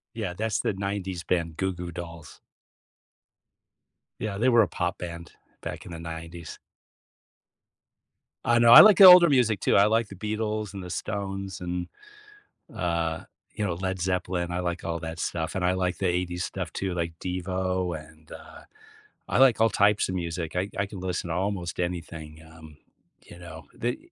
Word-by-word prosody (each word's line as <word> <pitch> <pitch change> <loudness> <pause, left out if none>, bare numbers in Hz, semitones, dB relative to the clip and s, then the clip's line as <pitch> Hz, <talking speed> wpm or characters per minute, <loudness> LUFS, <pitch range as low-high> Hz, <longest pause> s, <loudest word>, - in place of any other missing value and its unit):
Yeah. 105 -6 -4
That's 110 0 -1
the - - 0
'90s 95 -2 -4
band, 85 -3 -1
Goo 95 0 -1
Goo 85 -1 -7
Dolls. 85 -2 -9 1.8
Yeah. 100 -3 -3
They 125 +4 +2
were 120 -2 +6
a 95 - 0
pop 90 +1 -3
band 85 -1 -8 0.3
back - - -6
in 85 - -9
the 85 - -7
'90s. 85 0 -8 1.9
I 120 0 +3
know. 120 0 +6
I - - +13
like 210 -3 +8
the 195 - +10
older 180 -2 +10
music 120 -8 +2
too. - - +2
I 100 +1 +6
like 115 0 +1
the 100 - -10
Beatles 105 0 -3
and 95 - -6
the 90 - -8
Stones 95 0 -4
and, 90 0 -4 0.9
uh, 85 -2 -2 0.3
you 105 - -2
know, 90 - -1
Led 95 +1 -3
Zeppelin. 90 -1 -2
I 90 - -2
like 85 -1 -3
all 85 0 -3
that 80 0 -7
stuff 80 -1 -3
and 90 - -1
I 90 - +2
like 90 -1 -1
the 95 - -1
'80s 90 0 -1
stuff 90 -4 -5
too, 95 -2 -3
like 85 -1 -3
Devo, 90 -1 -2
and, 75 0 -18
uh, - - -12 0.7
I - - 0
like 130 -4 +5
all 115 - +4
types 105 +1 +2
of 95 - -3
music. 85 -2 -4
I 95 +3 -1
I 100 - 0
can 100 -2 -9
listen 90 -1 -3
to - - -1
almost 95 -2 -3
anything, 80 -3 -5
um, 80 -2 -14 0.5
you 85 - -14
know? 85 -2 -11 0.2
Th 120 +1 -1
90 Hz, 180 wpm, -26 LUFS, 85-100 Hz, 1.9 s, I